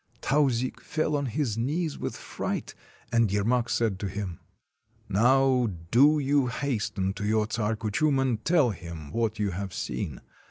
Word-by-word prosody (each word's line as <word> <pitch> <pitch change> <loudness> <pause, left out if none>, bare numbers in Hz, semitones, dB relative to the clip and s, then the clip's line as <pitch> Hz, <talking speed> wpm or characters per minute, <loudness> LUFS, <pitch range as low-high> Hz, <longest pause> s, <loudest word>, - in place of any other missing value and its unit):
Tauzik 130 -3 +1
fell 155 -1 -1
on 140 -1 0
his 115 -2 -1
knees 155 +6 -1
with - - -3
fright, - - -4 0.4
and 115 -4 +3
Yermak 115 +4 +1
said 110 -5 0
to 100 - -2
him: 95 -3 -5 0.3
— - - -53 0.3
"Now 125 +3 +4 0.2
do 145 +6 +6
you 140 -2 +2
hasten 110 -7 -1
to 100 - -6
your 105 +1 +2
Czar 110 -1 0
Kuchum 135 +7 +1
and 125 -5 0
tell 160 -8 +3
him 85 -5 -8
what 115 -2 -1
you 105 -2 0
have 95 +1 -5
seen. - - -4
115 Hz, 160 wpm, -27 LUFS, 105-135 Hz, 0.4 s, do